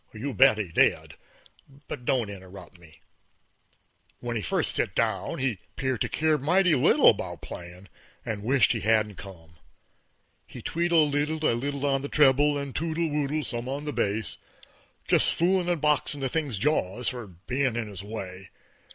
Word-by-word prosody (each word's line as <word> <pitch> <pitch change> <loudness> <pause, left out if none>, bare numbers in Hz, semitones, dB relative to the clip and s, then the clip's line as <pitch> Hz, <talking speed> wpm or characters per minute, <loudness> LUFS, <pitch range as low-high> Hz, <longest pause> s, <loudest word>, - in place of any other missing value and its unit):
_ - - -8
You 135 +3 -3
bet 130 -1 +5
he 105 -5 -3
did; - - +2 0.7
but 125 - -7
don't 120 -6 0
interrupt 95 -1 -12
me. 85 -2 -18 1.2
When 120 -1 -4
he 110 - -1
first 80 - 0
sit - - -1
down - - -1
he 125 -7 -1 0.2
'peared 130 -5 -2
to - - 0
keer 155 -1 +1
mighty 180 +5 +3
little 130 - +5
'bout - - -7
playin' 90 +2 -10 0.4
and 110 -2 -4
wisht 125 +2 +3
he 115 - -1
hadn't 105 -1 +1
come. 85 -4 -12 0.9
He - - -10
tweedle 170 -2 +2
leedled 150 +2 -1
a 135 - +3
little 140 +4 -3
on 135 -1 +1
a - - -3
treble, 145 0 +4
and 140 -2 -5
twoodle 165 0 -1
oodled 150 +1 -1
some 120 +1 -4
on 140 +2 -4
the 150 - -3
base, 105 -4 -2 0.7
just - - +3
foolin' 180 +1 +2
and 175 -2 0
boxin' 150 -1 +1
the 135 - -1
thing's 145 -7 -1
jaws 115 -3 0
for 120 -4 -7
bein' 125 +8 -2
in 120 -2 -2
his 100 -3 -7
way. 95 -3 -8
130 Hz, 170 wpm, -26 LUFS, 105-150 Hz, 1.2 s, bet